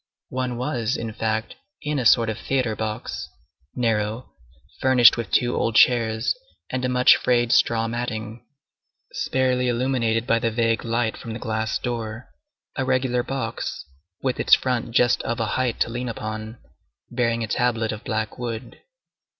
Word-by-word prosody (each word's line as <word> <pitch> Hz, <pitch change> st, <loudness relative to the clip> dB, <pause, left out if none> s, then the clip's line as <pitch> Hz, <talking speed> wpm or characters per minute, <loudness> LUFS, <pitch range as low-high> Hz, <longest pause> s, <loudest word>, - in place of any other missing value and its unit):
One 130 Hz, -1 st, -2 dB
was, 125 Hz, -2 st, -1 dB
in 115 Hz, -1 st, -5 dB
fact, 110 Hz, 0 st, -2 dB, 0.3 s
in 150 Hz, -1 st, -1 dB
a 125 Hz, -, -2 dB
sort 115 Hz, 0 st, +5 dB
of 110 Hz, 0 st, -3 dB
theatre 125 Hz, -5 st, 0 dB
box, 110 Hz, 0 st, -4 dB, 0.5 s
narrow, 115 Hz, 0 st, -1 dB, 0.5 s
furnished 130 Hz, -3 st, +6 dB
with 115 Hz, -2 st, -4 dB
two 120 Hz, 0 st, +2 dB
old 115 Hz, -, 0 dB
chairs, 110 Hz, -2 st, +4 dB, 0.4 s
and 130 Hz, 0 st, -2 dB
a 125 Hz, -, +1 dB
much 125 Hz, 0 st, +6 dB
frayed 120 Hz, -1 st, +1 dB
straw 115 Hz, -2 st, +3 dB
matting, 115 Hz, -1 st, -4 dB, 0.7 s
sparely 130 Hz, -1 st, 0 dB
illuminated 120 Hz, -2 st, 0 dB
by 115 Hz, -2 st, +2 dB
the 115 Hz, -, 0 dB
vague 115 Hz, 0 st, 0 dB
light 115 Hz, -1 st, 0 dB
from 115 Hz, -, -7 dB
the 115 Hz, -, -6 dB
glass 110 Hz, -1 st, -1 dB
door; 115 Hz, -1 st, -5 dB, 0.4 s
a 135 Hz, -, -1 dB
regular 130 Hz, -1 st, +1 dB
box, 135 Hz, +2 st, -4 dB, 0.4 s
with 130 Hz, -2 st, -1 dB
its -, -, +6 dB
front 125 Hz, -3 st, -2 dB
just 120 Hz, +1 st, +3 dB
of 115 Hz, -, -3 dB
a 115 Hz, -, +1 dB
height 125 Hz, -3 st, 0 dB
to -, -, +2 dB
lean 125 Hz, +1 st, -3 dB
upon, 110 Hz, 0 st, -5 dB, 0.5 s
bearing 115 Hz, -1 st, 0 dB
a -, -, -3 dB
tablet 115 Hz, -1 st, 0 dB
of 105 Hz, +1 st, -7 dB
black 110 Hz, 0 st, -3 dB
wood. 115 Hz, -2 st, -5 dB
115 Hz, 160 wpm, -23 LUFS, 110-125 Hz, 0.7 s, furnished